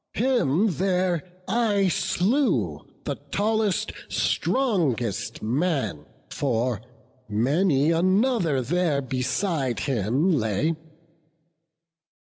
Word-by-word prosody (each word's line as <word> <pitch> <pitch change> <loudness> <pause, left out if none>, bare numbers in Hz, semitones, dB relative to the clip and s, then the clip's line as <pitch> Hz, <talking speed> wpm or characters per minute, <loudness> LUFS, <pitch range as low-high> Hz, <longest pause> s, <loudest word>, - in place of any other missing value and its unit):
Him 225 - +2
there 180 -2 +1 0.3
I 205 -2 +2
slew, 175 - +1 0.2
the - - -3
tallest, 215 -1 0 0.2
strongest 155 - 0
man; 120 - -1 0.2
For 120 -4 -1 0.5
many 140 - +2
another 185 - +2
there 150 0 0
beside 130 - -1
him 130 - +1
lay. 125 - +1
160 Hz, 75 wpm, -25 LUFS, 125-195 Hz, 0.5 s, Him